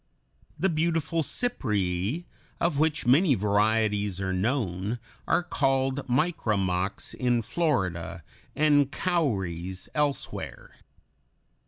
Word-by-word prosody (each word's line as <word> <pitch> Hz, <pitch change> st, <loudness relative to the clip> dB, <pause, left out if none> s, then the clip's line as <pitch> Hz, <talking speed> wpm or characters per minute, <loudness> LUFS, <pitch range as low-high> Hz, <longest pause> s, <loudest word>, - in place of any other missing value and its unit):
The 190 Hz, -, +2 dB
beautiful 165 Hz, -1 st, 0 dB
Cypræa 245 Hz, -, -1 dB, 0.5 s
(Fig. -, -, -30 dB, 0.3 s
105), -, -, 0 dB
of 150 Hz, -5 st, -2 dB
which 155 Hz, -1 st, +1 dB
many 140 Hz, +4 st, +5 dB
varieties 105 Hz, -1 st, +1 dB
are 95 Hz, -1 st, -1 dB
known, 100 Hz, 0 st, -1 dB, 0.3 s
are 180 Hz, -, +2 dB
called 135 Hz, -3 st, 0 dB
micramocks 105 Hz, -, 0 dB
in 120 Hz, -2 st, +1 dB
Florida, 105 Hz, -, -1 dB, 0.3 s
and 145 Hz, -2 st, +4 dB
cowries 95 Hz, -, -1 dB
elsewhere. 145 Hz, -2 st, -2 dB
130 Hz, 100 wpm, -27 LUFS, 100-155 Hz, 0.5 s, many